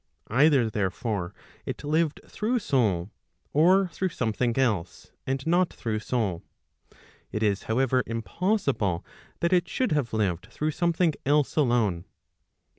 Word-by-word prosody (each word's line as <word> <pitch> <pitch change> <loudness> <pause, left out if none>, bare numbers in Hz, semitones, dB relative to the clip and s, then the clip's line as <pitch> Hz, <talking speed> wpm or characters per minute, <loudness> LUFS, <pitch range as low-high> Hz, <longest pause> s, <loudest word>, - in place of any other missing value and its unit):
Either 135 -1 +4
therefore 100 -2 -2 0.3
it - - -6
lived 155 +1 0
through 230 +4 -1
soul, 105 - +1 0.4
or 185 +6 +5
through 185 +2 -2
something 120 -3 -1
else, 110 -10 -1 0.2
and 135 0 -2
not 175 +2 +2
through 110 -2 -3
soul. 105 -7 -1 0.9
It 105 - -2
is 100 -2 +1
however 130 +2 +2
impossible 115 - -1 0.4
that 170 +2 +2
it 180 -1 +2
should 255 - 0
have 145 -6 0
lived 95 -6 -1
through 155 +1 -1
something 170 0 +1
else 145 0 +2
alone. 120 - +2
130 Hz, 125 wpm, -27 LUFS, 110-160 Hz, 0.9 s, or